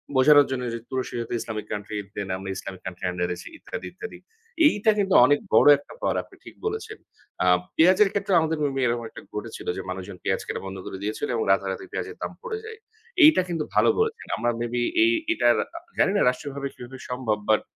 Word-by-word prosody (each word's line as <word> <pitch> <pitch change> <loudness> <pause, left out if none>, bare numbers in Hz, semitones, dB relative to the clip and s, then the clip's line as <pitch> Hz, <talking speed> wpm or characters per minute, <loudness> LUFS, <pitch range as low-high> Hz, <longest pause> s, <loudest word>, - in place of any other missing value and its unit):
বোঝানোর 145 +2 +7
জন্য 130 -1 -2
যে, 115 - -4
"তুরস্কে 130 -2 -3
যাতে 115 - -5
ইসলামিক 110 -2 -5
কান্ট্রিতে 105 -1 -5
নাম, 95 - -1
আমরা 95 0 -5
ইসলামিক 95 0 -7
কান্ট্রির 90 0 -3
আন্ডারে 90 0 -2
আছি, - - -10
ইত্যাদি, - - -7
ইত্যাদি।" 435 +1 -8 0.5
এইটা 220 -6 +3
কিন্তু 195 -2 +1
অনেক 145 +3 +3
বড় - - +6
একটা 145 - -14
পাওয়ার, - - 0
আপনি - - -19
ঠিক - - -12
বলেছেন। 435 0 -4 0.5
আ - - +2 0.3
পেঁয়াজের 185 +5 +5
ক্ষেত্রেও 200 -3 +2
আমাদের 160 0 0
অমনি 135 -2 0
এরকম 120 0 -1
একটা - - -11
ঘটেছিল, 110 +2 -6
যে - - -3
মানুষজন 95 +1 -6
পেঁয়াজ 95 - 0
কেনা - - -4
বন্ধ 95 0 -6
করে - - -6
দিয়েছিল 105 +1 -2
এবং 115 - 0
রাতারাতি 95 -1 0
পেঁয়াজের 430 +1 -5
দাম - - -3
পড়ে 470 -3 -3
যায়। 445 0 -8 0.5
এইটা 305 -10 +8
কিন্তু 165 -3 -1
ভালো - - +5
বলেছেন। 450 0 -1
আমরা 120 - 0
মে 120 - -1
বি 120 - 0 0.2
এই 340 - +5 0.2
এটার - - +4 0.2
আ - - -5 0.2
জানিনা 200 +1 +3
রাষ্ট্রীয়ভাবে 140 +2 -4
কিভাবে 125 +2 -10
সম্ভব? 125 -4 -1
বাট, 110 - +4
130 Hz, 205 wpm, -25 LUFS, -, 0.5 s, এইটা